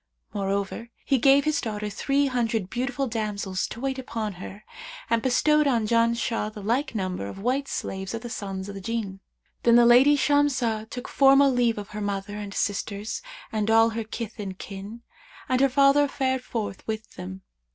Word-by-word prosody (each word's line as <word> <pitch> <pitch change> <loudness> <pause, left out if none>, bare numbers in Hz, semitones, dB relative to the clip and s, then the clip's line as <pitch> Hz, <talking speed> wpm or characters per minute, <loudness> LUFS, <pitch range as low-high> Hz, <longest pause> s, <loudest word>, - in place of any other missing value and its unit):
Moreover, 200 +3 -2 0.2
he 270 -2 +2
gave 275 +3 +5
his 305 -1 +1
daughter 210 -2 -3
three 275 +7 +1
hundred 230 -6 -1
beautiful 265 +2 -1
damsels 210 -5 -2
to - - -8
wait 265 +1 -2
upon 225 -5 -4
her 200 +3 -9 0.5
and 230 0 +3
bestowed 300 +4 +3
on 235 -5 +2
Janshah 230 -1 +1
the 210 -2 -9
like 240 +5 0
number 185 - -2
of 100 - -8
white 255 +7 -1
slaves 190 -2 -4
of 230 - -5
the - - -5
sons 195 -4 -5
of 200 - -6
the 195 - -7
Jinn. 205 -2 -3 0.4
Then 235 0 +5
the 240 0 +7
lady 260 +5 +7
Shamsah 260 -7 +1
took 245 0 -6
formal 275 0 +5
leave 240 -3 +2
of 205 0 -6
her 210 0 -6
mother 205 0 -3
and 205 -1 -6
sisters 205 +1 -2 0.3
and 215 -1 -1
all 225 +1 +5
her 225 0 -3
kith 220 0 -7
and 190 -3 -5
kin; 200 +5 -8 0.4
and 255 0 +1
her 275 - +5
father 275 +2 +5
fared 260 -1 -1
forth 215 -6 -4
with 220 0 -4
them. 95 +1 -8
230 Hz, 185 wpm, -26 LUFS, 205-260 Hz, 0.5 s, the